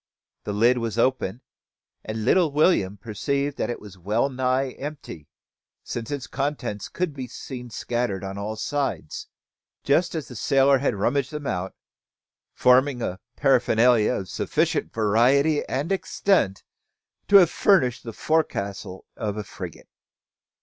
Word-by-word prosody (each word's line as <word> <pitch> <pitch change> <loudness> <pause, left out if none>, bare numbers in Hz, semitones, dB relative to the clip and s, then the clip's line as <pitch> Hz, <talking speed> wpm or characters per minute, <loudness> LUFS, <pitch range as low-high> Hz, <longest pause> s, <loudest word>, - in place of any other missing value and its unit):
The - - -2
lid 120 +4 +3
was 115 -1 -3
open, 125 -3 0 0.6
and 110 0 -4
little 170 +3 +4
William 140 - +2
perceived 140 +7 -2
that - - -1
it 120 - -3
was 100 -3 -13
wellnigh 130 +6 0
empty; 140 - -7 0.6
since 115 -2 -5
its 145 -3 -4
contents 135 -6 -3
could 175 -4 -2
be 130 -2 -6
seen 125 0 -8
scattered 120 -4 -2
on 95 0 -5
all 105 +2 -4
sides, 135 - -3 0.6
just 170 +5 +2
as 155 -4 -4
the 125 - -10
sailor 135 +3 +3
had 130 -4 0
rummaged 130 +7 0
them 150 -1 -6
out, 95 -5 -3 0.8
forming 125 0 +3
a 95 +1 -3 0.2
paraphernalia 125 -4 +3
of 95 - -4
sufficient - - -1
variety 125 +8 +3
and 145 +8 -2
extent 190 - +1 0.6
to 205 - +3
have 180 -4 +8
furnished 140 - +3
the 115 - -6
forecastle 100 -11 -2
of 105 -1 -3
a 105 - -3
frigate. - - -9
125 Hz, 135 wpm, -24 LUFS, 105-140 Hz, 0.8 s, have